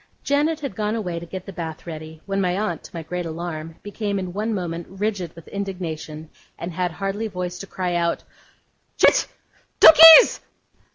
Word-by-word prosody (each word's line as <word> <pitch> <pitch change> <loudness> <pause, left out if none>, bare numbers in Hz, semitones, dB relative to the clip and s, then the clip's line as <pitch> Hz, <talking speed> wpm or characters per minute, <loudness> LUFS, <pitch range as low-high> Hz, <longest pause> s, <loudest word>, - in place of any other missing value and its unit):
Janet 300 +3 0
had 275 -8 -5
gone 210 0 -2
away 180 -7 -4
to 170 - -10
get 185 +1 -8
the 195 - -9
bath 160 -3 -7
ready, 160 -1 -9
when 195 0 -2
my 180 -1 0
aunt, 180 -6 -3
to - - -13
my 165 -1 -7
great 180 +3 -5
alarm, 165 -1 -6
became 205 0 -4
in 185 -2 -5
one 215 +3 -2
moment 175 -4 -4
rigid 190 -3 -4
with 165 - -14
indignation, 165 -6 -6 0.3
and 170 - -6
had 180 0 -3
hardly 200 +4 -3
voice 180 -3 -6
to 195 - -8
cry 180 -2 -3
out, 170 -1 -1 0.7
'Janet! - - +4 0.5
Donkeys! 325 +7 +9
180 Hz, 175 wpm, -22 LUFS, 170-205 Hz, 0.7 s, Donkeys